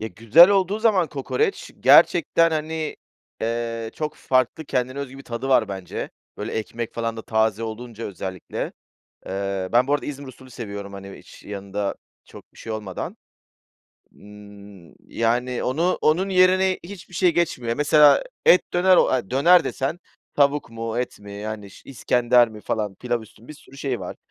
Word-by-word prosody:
Ya, 110 - -4
güzel 115 - +6
olduğu 195 +1 +1
zaman 215 -6 +3
kokoreç 390 - -2
gerçekten, 165 0 +5
hani, 155 0 -3 0.4
eee, 115 0 -3
çok 155 -1 -4
farklı, 130 +5 0
kendine 130 -1 -2
özgü 135 -1 -6
bir - - -10
tadı 120 +2 -5
var 120 -5 +3
bence. 95 -2 -6 0.3
Böyle, 105 +2 -5
ekmek 115 +1 -4
falan 115 -1 -3
da 110 - -6
taze 110 -1 0
olunca 115 0 -7
özellikle. 95 -2 -5 0.5
Eee, 95 -1 -3
ben 125 +2 +3
bu 145 - +2
arada 145 - -1
İzmir 140 -1 -7
usulü 130 0 -13
seviyorum, 100 -4 -7
hani, 100 0 -9
hiç - - -16
yanında 100 0 -4 0.3
çok - - -15
bir - - -21
şey 115 - -7
olmadan. 105 -4 -5 1.0
Imm, 100 -4 -15
yani, 120 +2 -1
onu 165 +8 0
onun 175 +6 +2
yerine 185 0 +3
hiçbir 185 -1 -11
şey 175 0 +2
geçmiyor. 125 -9 -1
Mesela 150 - +5 0.2
et 180 - +5
döner 185 +1 +4
o - - +4
a 125 -7 -1
döner 170 +8 +5
desen 135 +5 -3 0.4
tavuk 140 -2 +2
mu, 115 0 -4
et 125 - -3
mi, 100 0 -11
yani, 105 0 -6
ş - - -14
iskender 120 -2 +3
mi 110 -1 -11
falan, 105 -2 -3
pilav 120 +2 -2
üstü 110 0 -18
mü? 120 - -17
Bir - - -7
sürü 135 -2 -17
şey 135 -4 -3
var. - - -7
120 Hz, 170 wpm, -23 LUFS, 110-150 Hz, 1.0 s, güzel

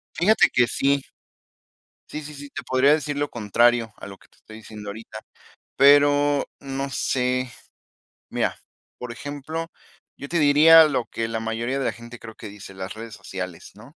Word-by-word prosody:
Fíjate 205 +7 +4
que 125 -1 +4
sí. 140 +3 +1 1.1
Sí, 155 - -6
sí, 150 +1 -9
sí, 145 0 -10
te - - -7
podría 130 +2 +3
decir 150 -1 0
lo 145 0 -1
contrario 115 +1 +2
a - - -10
lo 100 -1 -10
que - - -23
te - - -29
estoy 110 - -14
diciendo 105 -1 -9
ahorita, 110 +1 -9 0.6
pero 145 0 +5
no 135 0 -5
sé, 125 -1 -1 0.8
mira, - - -2 0.4
por 125 -1 -7
ejemplo, 155 +4 -6 0.5
yo 140 - -8
te 170 +3 0
diría 155 +2 +8
lo 130 -5 -1
que 115 0 -4
la 115 0 -2
mayoría 115 +4 -2
de 135 - -2
la - - 0
gente 120 +1 -12
creo 110 -1 -11
que 110 - -9
dice 100 -1 -11
las 95 0 -6
redes 115 0 -9
sociales, 95 -3 -7
¿no? 120 +9 -16
125 Hz, 175 wpm, -23 LUFS, 115-145 Hz, 1.1 s, diría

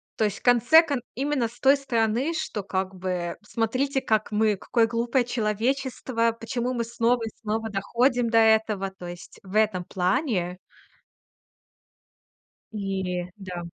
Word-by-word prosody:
То 220 - +1
есть, 210 -1 -2
в - - -31
конце 245 +6 +6
кон 280 -5 -2
именно 270 -2 0
с 235 +2 -16
той 270 +1 +6
стороны, 245 +2 0
что, 210 -9 -4
как 190 0 -3
бы, 180 -2 -3
смотрите, 255 +6 -1
как 215 -1 0
мы 210 0 +2
какое 225 +4 +1
глупое 235 +2 0
человечество, 235 +1 0
почему 240 +2 -2
мы 235 -1 -1
снова 235 0 +1
и - - -4
снова 220 +1 -2
доходим 240 +4 +1
до 230 - +3
этого. 220 -3 +3
То 175 - -8
есть, 175 0 -10
в 195 +1 -9
этом 210 -4 +2
плане. 185 - -1 2.2
И 190 -3 -3
да. 185 -4 -7
225 Hz, 145 wpm, -25 LUFS, 195-245 Hz, 2.2 s, конце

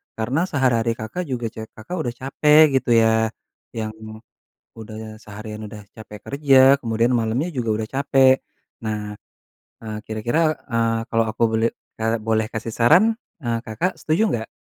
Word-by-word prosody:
Karena 120 +7 -1
sehari-hari 125 -7 +1
Kakak 110 +12 -5
juga 125 -3 -3
ce 110 0 -8
Kakak 110 +11 -7
udah 120 -5 -3
capek 150 +1 +5
gitu - - -8
ya, 110 0 +3 0.5
yang 110 -1 -3 0.9
udah 110 0 -9
seharian 105 0 -8
udah 105 0 -10
capek 105 -1 -11
kerja 140 -1 +2 0.2
kemudian 115 0 0
malamnya 115 +9 -1
juga 125 -7 -3
udah 110 - -6
capek. 135 -1 +4 0.5
Nah, 105 -1 -3 0.7
eee, 110 -1 -5
kira-kira, 110 +7 -1 0.3
eee, 115 -2 0
kalau 115 0 +3
aku 110 - -7
boleh, 110 +1 +2 0.3
eee, 115 +1 +1
boleh 110 0 0
kasih 110 0 -5
saran, 175 - +5 0.3
eee, 115 -1 0
Kakak 115 - -3
setuju 160 +7 +1
nggak? 110 -1 -3
115 Hz, 150 wpm, -22 LUFS, 110-135 Hz, 0.9 s, capek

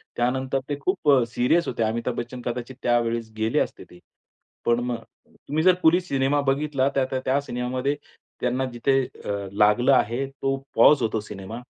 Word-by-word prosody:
त्यानंतर 130 +2 0
ते 145 - 0
खूप 175 -1 0
अ, 130 -3 +5
सीरियस 125 +8 +1
होते 115 - -1
अमिताभ 115 +2 -1
बच्चन 120 +1 -5
कदाचित 120 +1 -5
त्यावेळेस 115 -1 0
गेले 110 +1 +1
असते - - -3
ते. 90 - -16 0.7
पण 120 0 +3
मग 120 -1 -2 0.3
तुम्ही 155 +2 -4
जर 185 +1 +7
कुली 165 +3 +6
सिनेमा 140 -4 0
बघितला 140 -1 +1
त्या 135 - +2
त्या 130 - 0
त्या 135 +2 +2
सिनेमामध्ये 130 +2 -2 0.5
त्यांना 125 +2 0
जिथे 135 +3 +2 0.3
अ, - - -4 0.2
लागलं 105 +6 +4
आहे 125 +1 +1
तो 135 0 -2 0.2
पॉज 145 -3 +6
होतो 110 -1 0
सिनेमा 105 +3 -8
125 Hz, 170 wpm, -24 LUFS, 120-140 Hz, 0.7 s, जर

